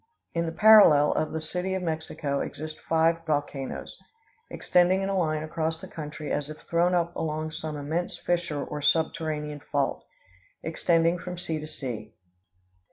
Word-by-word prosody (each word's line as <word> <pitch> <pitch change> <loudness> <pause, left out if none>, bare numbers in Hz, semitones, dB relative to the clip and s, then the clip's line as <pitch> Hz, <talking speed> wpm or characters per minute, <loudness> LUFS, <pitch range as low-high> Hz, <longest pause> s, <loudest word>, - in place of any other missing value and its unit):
In 170 0 0
the - - -2
parallel 165 -7 +7
of 155 - -1
the 160 - -2
City 180 +4 -2
of 190 - -3
Mexico 155 -4 -2
exist 155 +1 -5
five 165 +1 +3
volcanoes, 145 -3 -3 0.5
extending 180 +2 +3
in 195 - -1
a 195 - 0
line 155 -4 0
across 160 +1 -2
the - - -9
country 150 -1 -6
as 145 0 -1
if 155 - -8
thrown 175 +2 +2
up 170 0 0
along 155 0 -2
some 155 -1 -5
immense 160 +5 -2
fissure 170 -5 -1
or 150 - -5
subterranean 150 -1 0
fault, 145 - -1 0.6
extending 170 0 +2
from 180 +1 -6
sea 165 -3 -3
to 155 - -7
sea. 120 -8 -6
160 Hz, 160 wpm, -27 LUFS, 150-170 Hz, 0.6 s, parallel